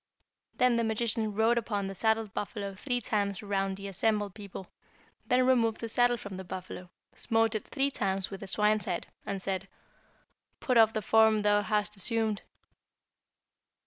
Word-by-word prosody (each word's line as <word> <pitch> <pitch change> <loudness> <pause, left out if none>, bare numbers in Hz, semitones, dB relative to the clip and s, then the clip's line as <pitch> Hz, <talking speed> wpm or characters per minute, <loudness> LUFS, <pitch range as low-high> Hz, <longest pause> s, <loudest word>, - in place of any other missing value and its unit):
Then 250 -2 +4
the 230 - +1
magician 220 0 0
rode 225 +2 +3
upon 205 -3 -2
the 195 - -4
saddled 220 0 0
buffalo 200 -1 -4
three 245 +5 -2
times 200 -3 -1
around 195 -1 -1
the 200 0 -7
assembled 205 +1 0
people, 200 -2 -8 0.6
then 250 0 +3
removed 230 -4 +2
the 230 - -4
saddle 245 +2 +2
from 200 -4 -8
the 190 - -6
buffalo, 180 0 -8 0.2
smote 225 -1 +1
it 215 - -4
three 280 0 0
times 195 -5 -2
with 195 - -6
the 195 - -8
swine's 210 +2 +2
head, 180 -4 -2 0.2
and 200 -1 -2
said, 190 0 -3 0.9
'Put 255 -4 +1
off 220 0 +6
the 215 - -2
form 220 0 +4
thou 205 0 +4
hast 210 0 -1
assumed.' 220 +1 +1
210 Hz, 165 wpm, -30 LUFS, 195-225 Hz, 0.9 s, off